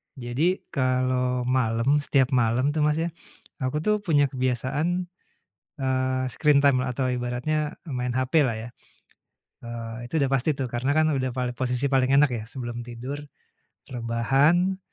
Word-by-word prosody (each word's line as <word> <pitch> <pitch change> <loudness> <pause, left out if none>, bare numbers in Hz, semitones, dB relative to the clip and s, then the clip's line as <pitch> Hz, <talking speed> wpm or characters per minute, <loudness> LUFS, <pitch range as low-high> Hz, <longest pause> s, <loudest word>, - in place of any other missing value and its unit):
Jadi 135 +9 -1
kalau 130 -2 +1
malam, 125 +2 +2
setiap 135 -2 +1
malam 125 +2 +2
tuh 155 - -2
mas 150 - +2
ya, 165 +2 -1 0.5
aku 135 +4 -2
tuh 210 +2 +2
punya 145 -8 +2
kebiasaan, 135 +7 -1 0.7
eee, 130 -1 0
screen 145 -2 +3
time 135 -2 +5
lah 125 -1 -3
atau 130 -2 0
ibaratnya 125 +5 -2
main 125 -3 -2
hape 130 +5 +2
lah 125 -6 +1
ya. 110 +2 -6 1.0
Eee 115 0 -6
itu 150 +6 -1
udah 135 - +2
pasti 135 +3 +1
tuh. 130 -3 -4
Karena 125 +4 0
kan 155 +1 +3
udah 130 -4 -1
pal 125 -1 -1
posisi 125 +2 0
paling 135 0 +2
enak 140 +1 +5
ya 115 -2 -3
sebelum 120 0 -6
tidur 125 +4 -6 0.7
rebahan 135 +10 +2
130 Hz, 155 wpm, -25 LUFS, 125-145 Hz, 1.0 s, time